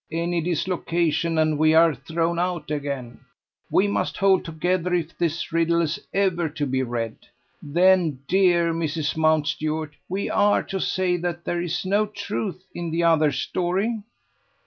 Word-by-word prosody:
"Any 170 +1 -1
dislocation, 170 -1 0
and 155 -1 +2
we 155 0 +4
are 165 0 +6
thrown 165 +4 -2
out 175 -3 -2
again! 140 -5 -4 0.5
We 195 - +3
must 200 - -1
hold 195 -1 +3
together 180 +2 -1
if 170 -1 -3
this 170 -1 -2
riddle 165 0 +2
is 165 -1 -1
ever 180 -4 +1
to 150 -1 -3
be 130 -1 0
read. 115 -3 -3 0.4
Then, 170 -2 +3
dear 175 -3 +3
Mrs. 160 -2 -2
Mountstuart, 155 0 0 0.2
we 190 +2 -2
are 205 0 +3
to 195 - -4
say 185 -1 0
that 175 0 -4
there 175 0 -1
is 175 +1 -3
no 205 +3 +2
truth 200 -2 -5
in 170 -1 -4
the 165 +1 0
other 160 -3 +4
story?" 185 - -1
170 Hz, 150 wpm, -24 LUFS, 155-180 Hz, 0.5 s, are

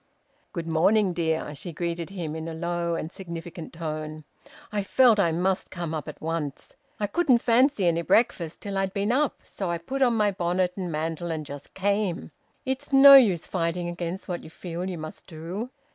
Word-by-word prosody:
"Good 170 -2 -4
morning, 185 +4 +3
dear," 160 -3 -1
she 170 +5 -6
greeted 170 +1 -3
him 170 -6 -5
in 160 0 -5
a 165 - -5
low 170 0 -1
and 165 0 -4
significant 170 -3 -8
tone. 155 -1 -5 0.5
"I 205 -1 0
felt 230 +2 +4
I 170 -4 +3
must 185 +3 0
come 170 -3 -4
up 155 -2 -4
at - - -8
once. 160 -3 -4 0.2
I 210 - +1
couldn't 255 - +3
fancy 235 -2 +3
any 170 -1 +2
breakfast 170 -4 +1
till 200 -1 -3
I'd 195 0 -1
been 200 +2 +1
up, 280 +2 +1
so 190 -3 -4
I 170 - 0
put 265 +12 -5
on 245 -3 +4
my 210 -2 +3
bonnet 180 0 0
and 180 -3 -4
mantle 165 +2 -3
and 160 -2 -3
just 140 0 -10
came. 200 -2 -1 0.3
It's 265 +1 -3
no 275 +1 +10
use 210 -11 +7
fighting 175 -1 -1
against 175 +2 -5
what 175 -2 -4
you - - -10
feel 175 +2 -5
you 180 - -4
must 155 0 -8
do." 175 +8 -6
175 Hz, 190 wpm, -26 LUFS, 165-200 Hz, 0.5 s, no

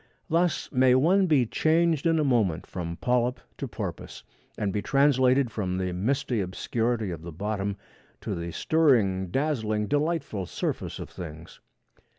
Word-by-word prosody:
Thus 170 +1 +1
may 130 -1 +4
one 185 +8 +4
be 145 -7 +4
changed 160 +4 +2
in 165 0 +3
a 155 - +2
moment 110 - +1
from 85 -2 -5
polyp 125 0 +1 0.2
to - - -3
porpoise, - - -6 0.3
and 100 -2 -1
be 105 - -1
translated 135 -1 +3
from 95 -4 -2
the 95 -1 -2
misty 120 +4 0
obscurity 110 +3 -1
of 85 -2 -6
the 85 +1 -8
bottom 100 +3 -3 0.4
to - - -3
the 85 0 -4
stirring, 105 - +2
dazzling, 110 - 0
delightful 145 - -1
surface - - -3
of - - -8
things. 80 -1 -9
120 Hz, 150 wpm, -27 LUFS, 95-145 Hz, 0.4 s, may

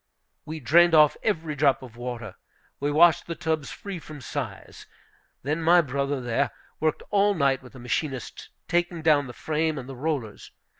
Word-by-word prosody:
We 160 +1 -6
drained 165 +6 +5
off 150 -1 +6
every 165 -7 -1
drop 140 -2 +2
of 120 -3 -11
water. 120 -4 -6 0.5
We 145 - 0
washed 165 +2 +5
the 170 - -4
tubs 160 -3 -2
free 195 -3 -7
from 155 -2 -10
size. 130 -7 -6 0.6
Then 150 +5 -1
my 170 +2 +6
brother, 140 -1 -2
there, 125 +3 0 0.3
worked 155 0 0
all 205 0 +3
night 135 -4 +2
with 125 0 -15
the 130 - -11
machinists, 130 +1 -4 0.2
taking 175 -1 0
down 150 -3 +4
the 125 - -8
frame 155 +3 -1
and 130 -2 -6
the 135 - -8
rollers. 135 -5 -4
150 Hz, 170 wpm, -26 LUFS, 130-160 Hz, 0.6 s, off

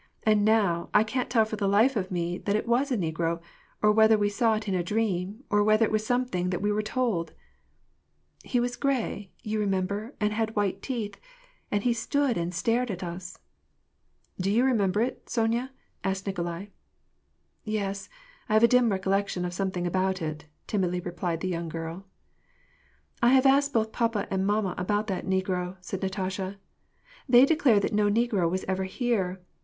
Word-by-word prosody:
And 215 -1 +3
now 200 -6 +2
I 210 - +7
can't 250 +3 -2
tell 230 -3 +4
for 215 0 -5
the 200 -1 0
life 220 +7 +4
of 190 -3 -1
me 175 0 -2
that 200 - -1
it 215 - -1
was 255 +4 +2
a 250 - +2
negro, 165 -1 -1 0.4
or 210 - +6
whether 220 +1 +5
we 205 -1 +1
saw 220 +2 +2
it 215 0 -4
in 195 - 0
a 180 - +1
dream, 205 +2 -2
or 205 0 +4
whether 215 +2 +4
it - - -3
was 215 0 +1
something 245 -7 0
that 180 - -1
we 205 +2 0
were 210 +1 +1
told! 215 -6 -1 0.4
" - - -43
" - - -30
He 245 - +3
was 245 0 -1
gray, 245 -8 -2
you 215 0 -2
remember, 200 +4 -1
and 210 -1 +1
had 220 0 -1
white 200 -2 0
teeth, 230 -6 -4 0.5
and 205 0 0
he 245 - +3
stood 270 +2 0
and 170 -1 -2
stared 230 +7 0
at 185 -3 -4
us 175 +1 -7 0.3
" - - -46
— - - -46
" - - -12
Do 190 - 0
you 225 +5 +3
remember 210 -5 +2
it, 250 +3 -3
Sonya? 235 +3 0 0.2
" - - -43
asked 190 0 -2
Nikolai. 175 -1 -3 1.0
"Yes, 200 -2 -3 0.4
I - - 0
have 215 +1 +5
a - - +9
dim 250 -1 +4
recollection 195 -1 0
of 175 - -4
something 185 -1 -2
about 185 +1 0
it," 155 -1 -5 0.2
timidly 180 -4 0
replied 175 -1 -3
the 185 - -1
young 170 -2 -3
girl, 165 +4 -6 0.6
" - - -36
I 240 +2 +5
have 260 0 +4
asked 280 +1 +4
both 220 -3 +1
papa 230 -4 0
and 190 0 0
mamma 205 -2 +1
about 205 +3 0
that 190 -1 -3
negro," 185 -1 -1
said 185 +1 -6
Natasha. 190 0 -3 0.4
" - - -27
They 250 +1 +8
declare 280 -8 +4
that 200 - -2
no 205 0 +3
negro 210 -5 +2
was 185 +2 -2
ever 190 0 -1
here. 190 -3 -1
205 Hz, 200 wpm, -27 LUFS, 185-225 Hz, 1.0 s, a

